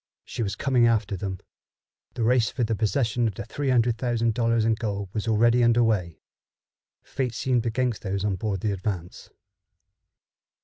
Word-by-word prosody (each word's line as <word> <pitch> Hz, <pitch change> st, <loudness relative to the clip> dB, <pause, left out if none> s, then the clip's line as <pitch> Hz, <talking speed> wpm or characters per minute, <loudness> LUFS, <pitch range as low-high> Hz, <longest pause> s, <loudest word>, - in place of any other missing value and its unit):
She -, -, -5 dB
was 100 Hz, -3 st, -2 dB
coming 125 Hz, -1 st, +3 dB
after 110 Hz, -3 st, +1 dB
them. 95 Hz, 0 st, -4 dB, 0.8 s
The 120 Hz, -, -1 dB
race 115 Hz, -1 st, +3 dB
for 125 Hz, -, -2 dB
the 115 Hz, 0 st, 0 dB
possession 115 Hz, +2 st, 0 dB
of 105 Hz, -, -4 dB
three 135 Hz, +8 st, -4 dB
hundred 120 Hz, -2 st, +2 dB
thousand 115 Hz, -2 st, 0 dB
dollars 115 Hz, -1 st, +1 dB
in 115 Hz, -, +3 dB
gold 100 Hz, -3 st, -3 dB
was 110 Hz, +1 st, -3 dB
already 115 Hz, +2 st, +4 dB
under 120 Hz, 0 st, +4 dB
way. 90 Hz, -7 st, -1 dB, 0.8 s
Fate 125 Hz, -4 st, -3 dB
seemed 125 Hz, -2 st, 0 dB
against 120 Hz, -1 st, -1 dB
those 95 Hz, 0 st, -2 dB
on 100 Hz, -2 st, 0 dB
board 95 Hz, -1 st, -3 dB
the 105 Hz, -, 0 dB
Advance. 95 Hz, -3 st, -5 dB
115 Hz, 165 wpm, -25 LUFS, 100-120 Hz, 0.8 s, already